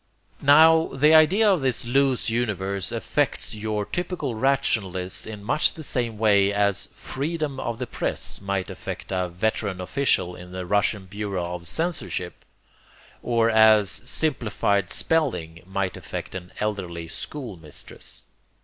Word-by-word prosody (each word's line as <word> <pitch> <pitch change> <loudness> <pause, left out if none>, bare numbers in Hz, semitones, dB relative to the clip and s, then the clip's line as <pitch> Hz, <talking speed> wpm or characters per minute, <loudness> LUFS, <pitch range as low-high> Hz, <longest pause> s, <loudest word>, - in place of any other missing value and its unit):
Now 160 +3 +7
the 150 +4 +5
idea 170 +8 +6
of 190 -6 +3
this 130 -3 +1
loose 135 +1 +2
universe 100 -5 -1
affects - - -1
your 105 -1 -2
typical 175 - -3
rationalists 110 -8 0
in 105 -2 -7
much 155 +10 +2
the 160 - -8
same 120 -5 -1
way 100 -2 +4
as 100 -1 0
'freedom 145 -1 -3
of 120 -3 -3
the 125 - -3
press' 115 - -3
might 100 -1 -2
affect 95 0 -7
a 90 -1 -1
veteran 95 +1 -2
official 90 -4 0
in 90 0 -11
the 90 0 -4
russian 100 +1 +1
bureau 95 -3 -4
of 85 -1 -5
censorship; 160 - -2 0.8
or 115 -1 +2
as 110 -2 +6
'simplified 105 - 0
spelling' 100 - 0
might 95 -1 -2
affect - - -6
an 90 -1 -7
elderly 90 -6 -3
schoolmistress. 95 - -7
105 Hz, 130 wpm, -24 LUFS, 95-135 Hz, 0.8 s, Now